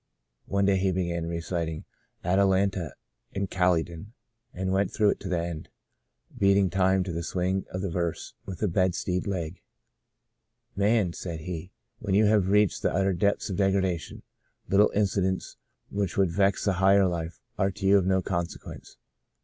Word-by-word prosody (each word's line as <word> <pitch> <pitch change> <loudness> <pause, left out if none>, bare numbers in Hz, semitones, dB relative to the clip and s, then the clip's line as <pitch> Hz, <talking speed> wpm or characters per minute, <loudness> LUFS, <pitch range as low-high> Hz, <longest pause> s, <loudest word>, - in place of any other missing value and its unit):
One 100 0 +1
day 100 -1 +3
he 95 0 +1
began 85 -2 -2
reciting 85 -1 -3 0.2
* - - -45
Atalanta 95 -2 +2 0.4
in 100 0 -1
Caly 90 -3 +2
don,' 85 +6 -11 0.4
and 95 +1 -3
went 95 0 +1
through 105 -1 +3
it - - -4
to 95 - -6
the 90 -2 +1
end, 85 -2 -5 0.7
beat 100 0 +4
ing 95 -3 +2
time 95 +1 +3
to 90 -2 -5
the 85 - -2
swing 90 +3 -1
of 90 +1 -4
the 100 - -1
verse 85 -1 -3
with 95 +2 -6
a - - +3
bedstead 90 0 0
leg.... 90 -3 -4 0.6
* - - -51
Man,' 100 -3 +2
said 85 -3 -6
he, 85 +1 -6 0.2
* - - -48
when 100 -3 -1
you 105 +2 +5
have 105 -3 +3
reached 105 -1 +3
the - - +1
utter 95 +1 +1
depths 100 +3 0
of 95 - -3
degra 95 -1 +2
dation, 90 -3 -4 0.4
little 100 +2 +5
incidents 95 -2 0 0.3
which 100 -2 -2
would 95 -3 +3
vex 95 +1 +1
a 100 - +3
higher 95 +1 +5
life 85 -2 -3 0.2
are 95 - +3
to 95 +1 -6
you 100 +1 +6
of 95 - -1
no 95 -1 +2
consequence. 85 -2 -5
95 Hz, 180 wpm, -27 LUFS, 85-100 Hz, 0.7 s, you